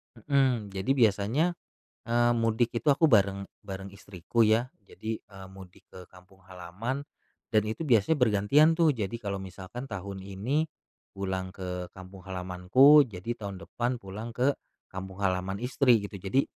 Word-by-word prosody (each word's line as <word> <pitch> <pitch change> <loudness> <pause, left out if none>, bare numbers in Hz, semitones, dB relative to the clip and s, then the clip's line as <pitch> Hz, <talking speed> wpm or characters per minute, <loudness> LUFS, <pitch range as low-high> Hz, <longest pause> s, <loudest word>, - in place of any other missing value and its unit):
Mhm, 125 -4 +1
jadi 95 +7 -1
biasanya, 110 - +2 0.6
eee, 120 0 +3
mudik 115 +1 +1
itu 135 - -4
aku 160 +3 +3
bareng 100 -2 +3 0.2
bareng 95 0 -6
istriku 100 +3 -1
ya, 115 +4 +2 0.2
jadi, 110 0 -5
eee 95 -2 -13
mudik 95 -2 -15
ke 90 -1 -11
kampung 95 +1 -19
halaman 95 +9 -5 0.5
dan 110 - +3
itu 110 +8 -4
biasanya 115 +6 +4
bergantian 125 +9 +4
tuh, 165 -3 +4
jadi 110 -2 -3
kalo 100 -4 -4
misalkan 95 +7 -8
tahun 100 -1 -6
ini 115 +12 -2 0.5
pulang 95 -1 -3
ke 90 -1 -5
kampung 95 0 -11
halamanku, 95 +11 +5
jadi 100 +4 -5
tahun 100 -4 -7
depan 120 +1 -2
pulang 105 +3 -8
ke 130 +3 +3 0.4
kampung 95 0 -7
halaman 95 0 -1
istri, 125 +1 +3
gitu. 100 -2 -8
Jadi 100 +9 +1
100 Hz, 150 wpm, -28 LUFS, 95-120 Hz, 0.6 s, halamanku